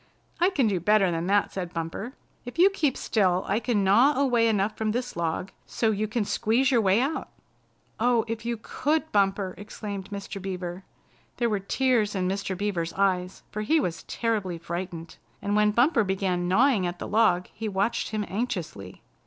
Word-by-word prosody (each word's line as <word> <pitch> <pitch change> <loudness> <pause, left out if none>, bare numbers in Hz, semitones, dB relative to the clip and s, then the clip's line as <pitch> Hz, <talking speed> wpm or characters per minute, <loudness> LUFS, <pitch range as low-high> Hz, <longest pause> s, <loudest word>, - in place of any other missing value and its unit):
"I 355 +2 +4
can 290 -10 +1
do 200 -4 +1
better 195 +1 +3
than 165 +1 -2
that," 205 +1 +2
said 180 -3 -5
Bumper. 165 - -4 0.3
"If 245 +4 -9
you 375 +3 +6
keep 305 -9 0
still 185 -4 +1
I 200 +3 +1
can 235 -4 0
gnaw 245 +9 +4
away 245 -4 +3
enough 210 -1 +1
from 215 -1 -1
this 245 +1 -3
log 170 +3 -2 0.2
so 225 -2 +1
you 215 +1 -1
can 215 0 -1
squeeze 235 +6 +1
your 240 -3 +4
way 195 +1 +3
out." 275 +5 -1 0.7
"Oh, 235 0 +3
if 230 0 -4
you 235 0 -2
could, 305 +7 -1
Bumper!" 195 -2 +1
exclaimed 205 -2 -7
Mr. 200 -1 -6
Beaver. 185 -1 -5 0.5
There 235 -2 +1
were 205 - +1
tears 220 0 +1
in 185 -1 0
Mr. 190 0 -2
Beaver's 175 -5 -2
eyes, 185 -2 0
for 215 - -3
he 315 +10 +3
was 175 - -2
terribly 210 -7 -2
frightened, 170 -1 -6 0.2
and 205 0 -1
when 210 0 +4
Bumper 240 +3 +3
began 190 -2 -1
gnawing 215 0 +3
at 175 0 -4
the - - -6
log 205 -5 +3
he 220 0 -4
watched 200 +4 0
him 215 -1 -2
anxiously. 175 - -4
205 Hz, 185 wpm, -26 LUFS, 185-235 Hz, 0.7 s, you